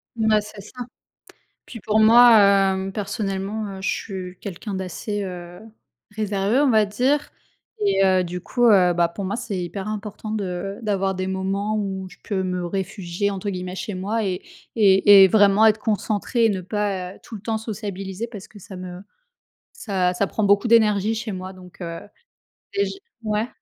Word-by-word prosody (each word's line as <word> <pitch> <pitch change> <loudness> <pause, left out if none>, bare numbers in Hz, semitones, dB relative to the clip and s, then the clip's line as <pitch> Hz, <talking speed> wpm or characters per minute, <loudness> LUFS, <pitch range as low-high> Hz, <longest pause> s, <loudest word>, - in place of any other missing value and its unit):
Mais 220 -2 +2
c'est 210 -1 -11
ça. 245 +4 -8 0.8
Puis 230 - -9
pour 215 +2 +1
moi, 235 +2 +8
hem, 195 -1 +3
personnellement, 200 0 -3
heu, 190 - -9
je - - -1
suis 185 -3 -5
quelqu'un 200 +1 -6
d'assez, 190 +3 -4
heu, 175 -1 -8 0.5
réservé, 210 +2 0
on 285 -3 +3
va 215 -2 +4
dire 260 +8 0 0.6
et 390 - +3
heu, 185 -1 +3
du 180 +1 -6
coup, 245 -1 +1
heu, 185 -5 +5
bah, 170 0 +2
pour 190 +3 -6
moi 200 +4 -2
c'est 205 -6 -4
hyper 190 +3 -5
important 215 0 -6
de 195 -1 -4
d'avoir 195 -2 0
des 185 0 -3
moments 195 +3 -2
où 190 -2 -4
je - - -16
peux 195 -3 -2
me 180 -1 -2
«réfugier» 190 +1 -3
entre 195 +1 -4
guillemets 180 -1 -4
chez 200 +1 -5
moi 210 +5 -2
et 185 -2 -2 0.3
et 200 -1 +7
et - - +6
vraiment 205 +1 +5
être 215 0 +4
concentrée 220 +2 0
et - - +3
ne 190 -2 -2
pas, 190 -1 -3
heu, - - -17
tout 225 - -9
le - - -10
temps 220 +2 -2
sociabiliser, 205 -2 -5
parce 210 -5 -10
que 210 - -14
ça 190 0 -11
me 180 0 -8 0.7
ça 185 -4 -1
ça 200 - +1
prend 215 +2 -3
beaucoup 200 +3 +3
d'énergie 215 -2 +4
chez 220 -1 -4
moi 185 0 -6
donc 180 0 -15
heu 170 -1 -5 0.8
et 400 0 +2
j - - -4 0.3
ouais? 215 +2 -1
200 Hz, 185 wpm, -22 LUFS, 185-215 Hz, 0.8 s, moi